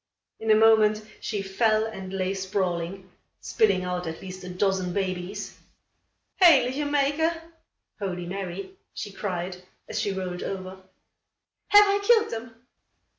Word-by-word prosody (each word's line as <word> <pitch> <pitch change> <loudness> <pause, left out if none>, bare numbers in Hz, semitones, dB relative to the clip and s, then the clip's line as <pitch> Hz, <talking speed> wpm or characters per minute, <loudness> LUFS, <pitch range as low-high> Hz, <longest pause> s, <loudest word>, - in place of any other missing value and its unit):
In 220 - -4
a 215 - +7
moment, 215 -1 +5 0.2
she 205 -3 -3
fell 215 +3 +2
and 190 -4 -7
lay 190 0 -1
sprawling, 190 -1 -3 0.3
spilling 430 - +2
out 180 -1 -3
at 160 0 -5
least 185 0 -9
a 180 - -7
dozen 185 -1 0
babies. 190 +1 -4 0.8
"Heilige 285 -4 +5
Mayke" 290 +3 +2 0.7
(Holy 180 -3 -3
Mary!), 190 +1 -5 0.2
she 205 - -5
cried, 180 -2 -4 0.3
as - - -3
she 200 - -1
rolled 185 -2 -4
over. 190 0 -6 0.9
"Have 415 0 +8
I 400 0 +2
killed 445 +1 +4
them?" 230 +1 -6
195 Hz, 130 wpm, -26 LUFS, 185-225 Hz, 0.9 s, Have